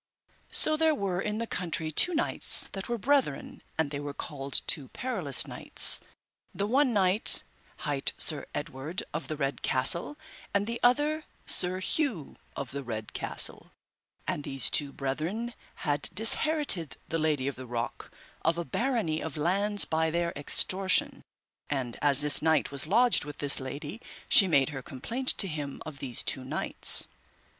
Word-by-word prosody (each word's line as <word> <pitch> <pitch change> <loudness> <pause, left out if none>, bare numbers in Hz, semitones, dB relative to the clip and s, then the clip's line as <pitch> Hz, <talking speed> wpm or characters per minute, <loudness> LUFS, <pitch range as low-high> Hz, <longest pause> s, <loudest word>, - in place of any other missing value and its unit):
So 310 - +4
there 320 -1 +2
were 190 -7 -3
in 210 +1 -3
the 230 - -3
country 165 -6 -4
two 350 - +3
knights 320 - +3
that 195 +2 -7
were 240 - -2
brethren, 260 - -1 0.2
and 160 -3 -1
they 140 - -4
were 145 -1 -7
called 140 -3 -4
two 140 -4 -2
perilous 190 - -2
knights, - - +4 0.5
the 200 - -2
one 260 +4 +2
knight 195 -1 +7 0.4
hight 145 -3 +1
Sir - - -1
Edward 145 +8 -5
of 155 - -5
the 155 - -5
Red 140 -1 -3
Castle, 170 - +2 0.4
and 200 0 +1
the 235 +2 -5
other 295 +5 +1 0.2
Sir 185 +1 +1
Hue 220 - -2 0.2
of 140 -3 -6
the 140 +1 -5
Red 110 -3 -7
Castle; - - +1 0.5
and 145 - -3
these 135 -4 -1
two 145 -1 +1
brethren 165 - -4 0.3
had 145 -1 +1
disherited 225 - +2
the 165 - -3
Lady 150 -4 -1
of 140 - -3
the 130 0 -10
Rock 120 0 -5 0.3
of 165 +1 0
a 170 - -4
barony 220 - -2
of 160 -2 -6
lands 200 +6 +4
by 160 0 0
their 170 +1 -2
extortion. 185 +6 0 0.5
And 130 -5 -4
as 145 -1 +4
this 150 - +4
knight 160 -2 +1
was 140 +1 -4
lodged 245 +6 +3
with 145 0 -9
this 145 -1 -1
lady 145 - -7 0.3
she 195 - +6
made 140 -5 +2
her 135 -3 -7
complaint 230 - -7
to 195 - +3
him 150 -4 -6
of 150 -3 -9
these 125 -4 -4
two 130 - -2
knights. 130 - +2
160 Hz, 165 wpm, -28 LUFS, 140-210 Hz, 0.5 s, knight